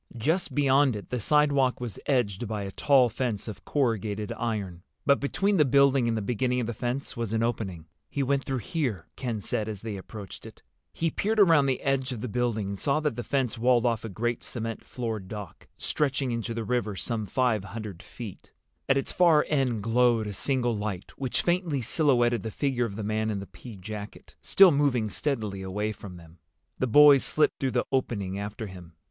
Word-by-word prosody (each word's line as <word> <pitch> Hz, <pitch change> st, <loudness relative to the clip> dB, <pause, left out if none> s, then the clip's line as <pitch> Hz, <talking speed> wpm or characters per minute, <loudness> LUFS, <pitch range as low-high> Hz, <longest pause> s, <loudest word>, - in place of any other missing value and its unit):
Just 160 Hz, +11 st, 0 dB
beyond 140 Hz, -2 st, +4 dB
it 105 Hz, -, -8 dB
the 125 Hz, -, -1 dB
sidewalk 140 Hz, 0 st, +3 dB
was 120 Hz, -6 st, -5 dB
edged 120 Hz, -6 st, 0 dB
by 105 Hz, -1 st, -3 dB
a 100 Hz, -, -5 dB
tall 135 Hz, +3 st, +4 dB
fence 115 Hz, -2 st, -3 dB
of 110 Hz, -, -7 dB
corrugated 110 Hz, -6 st, -1 dB
iron, 105 Hz, -7 st, -3 dB, 0.2 s
but 140 Hz, -, +4 dB
between 195 Hz, +8 st, +1 dB
the 150 Hz, -, +6 dB
building 140 Hz, -2 st, +4 dB
and 115 Hz, -1 st, 0 dB
the 110 Hz, -, -2 dB
beginning 125 Hz, +4 st, 0 dB
of 120 Hz, -, -1 dB
the 120 Hz, -, -3 dB
fence 125 Hz, +5 st, -3 dB
was 115 Hz, -2 st, -3 dB
an 115 Hz, 0 st, +1 dB
opening. 95 Hz, -8 st, -3 dB, 0.2 s
"He 140 Hz, -, -1 dB
went 135 Hz, +1 st, +1 dB
through 130 Hz, -3 st, -3 dB
here," 125 Hz, -, -1 dB
Ken 115 Hz, -5 st, -3 dB
said, 110 Hz, +2 st, -2 dB
as 105 Hz, -3 st, -5 dB
they 110 Hz, -3 st, -4 dB
approached 100 Hz, 0 st, -9 dB
it. -, -, -15 dB, 0.3 s
He 165 Hz, -1 st, -1 dB
peered 215 Hz, +6 st, 0 dB
around 165 Hz, -8 st, +6 dB
the 130 Hz, -2 st, 0 dB
edge 135 Hz, -1 st, 0 dB
of 120 Hz, -4 st, -5 dB
the 125 Hz, -, -3 dB
building 115 Hz, -3 st, -1 dB
and 100 Hz, -1 st, -5 dB
saw 140 Hz, +1 st, +1 dB
that 150 Hz, -6 st, -1 dB
the 120 Hz, -, -3 dB
fence 130 Hz, -2 st, -1 dB
walled 120 Hz, 0 st, +3 dB
off 115 Hz, -2 st, +1 dB
a 115 Hz, -, -5 dB
great 120 Hz, +4 st, -2 dB
cement 115 Hz, -2 st, -5 dB
floored 110 Hz, -6 st, -4 dB
dock, 105 Hz, -2 st, -8 dB
stretching 135 Hz, -3 st, 0 dB
into 115 Hz, 0 st, -3 dB
the 115 Hz, -, -2 dB
river 110 Hz, -3 st, -1 dB
some 110 Hz, +1 st, -3 dB
five 115 Hz, -2 st, +1 dB
hundred 105 Hz, -3 st, -7 dB
feet. 110 Hz, -6 st, -10 dB, 0.4 s
At 135 Hz, -, +5 dB
its 135 Hz, -, -1 dB
far 165 Hz, -4 st, +4 dB
end 130 Hz, -8 st, +1 dB
glowed 115 Hz, 0 st, +3 dB
a 105 Hz, -, -4 dB
single 120 Hz, +2 st, 0 dB
light, 105 Hz, -3 st, -4 dB
which 130 Hz, -3 st, -1 dB
faintly 175 Hz, -5 st, +1 dB
silhouetted 120 Hz, -3 st, +2 dB
the 110 Hz, -, -4 dB
figure 125 Hz, +1 st, 0 dB
of 100 Hz, -4 st, -6 dB
the 110 Hz, -, -4 dB
man 110 Hz, +1 st, -1 dB
in 105 Hz, -, -1 dB
the 100 Hz, -, -6 dB
pea 115 Hz, +2 st, -11 dB
jacket, 105 Hz, +2 st, -8 dB
still 195 Hz, -2 st, +7 dB
moving 130 Hz, -7 st, +1 dB
steadily 110 Hz, -9 st, -2 dB
away 105 Hz, +3 st, -2 dB
from 100 Hz, -4 st, -10 dB
them. 85 Hz, 0 st, -16 dB, 0.4 s
The 130 Hz, -, +1 dB
boys 145 Hz, +2 st, +7 dB
slipped 155 Hz, -, +1 dB
through 130 Hz, -3 st, -1 dB
the 125 Hz, -, +1 dB
opening 100 Hz, -7 st, -1 dB
after 105 Hz, +2 st, -5 dB
him. 90 Hz, -4 st, -11 dB
120 Hz, 205 wpm, -27 LUFS, 105-135 Hz, 0.4 s, still